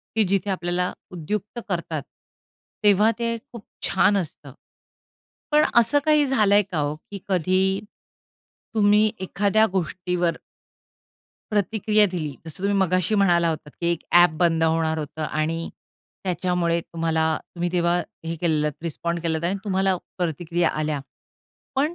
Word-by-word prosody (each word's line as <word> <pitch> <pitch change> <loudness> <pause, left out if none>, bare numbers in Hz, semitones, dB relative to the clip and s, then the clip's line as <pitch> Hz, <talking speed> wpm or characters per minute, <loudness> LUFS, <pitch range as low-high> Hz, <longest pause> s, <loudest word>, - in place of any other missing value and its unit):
की 220 - +4
जिथे 195 +1 0
आपल्याला 180 0 -1 0.2
उद्युक्त 205 +7 -4
करतात, 165 -4 -2 0.8
तेव्हा 210 +2 +5
ते 230 0 -1
खूप 235 -4 -10 0.2
छान 205 - +3
असतं. 150 -6 -6 1.0
पण 300 0 +5
असं 235 +5 +5
काही 300 -1 +4
झालंय 210 -6 +4
का 160 - -1
हो, 145 +1 -1 0.2
की 200 - -6
कधी 190 +1 +2 0.9
तुम्ही 210 0 +4
एखाद्या 205 +3 +2
गोष्टीवर 180 -1 -1 1.1
प्रतिक्रिया 210 +1 +2
दिली. 155 -6 -4
जसं 160 +2 -8
तुम्ही 200 0 +2
मगाशी 185 +2 +2
म्हणाला 175 -4 +3
होतात 155 -2 -5
की 170 - +1
एक 170 - -2
ॲप 175 0 +8
बंद 165 -2 +3
होणार 160 0 +1
होतं 155 +1 -5
आणि 160 +2 -2 0.5
त्याच्यामुळे 180 -2 0
तुम्हाला 165 -1 -1 0.3
तुम्ही 175 0 -2
तेव्हा 175 -1 +2 0.3
हे 165 +1 -3
केलेलेत 150 -3 +1
रिस्पॉन्ड 170 +1 -3
केलत 160 -1 -1
आणि 190 +3 0
तुम्हाला 190 -2 +1 0.2
प्रतिक्रिया 170 0 0
आल्या. 155 -1 -2 0.8
पण 295 +5 +1
180 Hz, 130 wpm, -23 LUFS, 165-205 Hz, 1.1 s, ॲप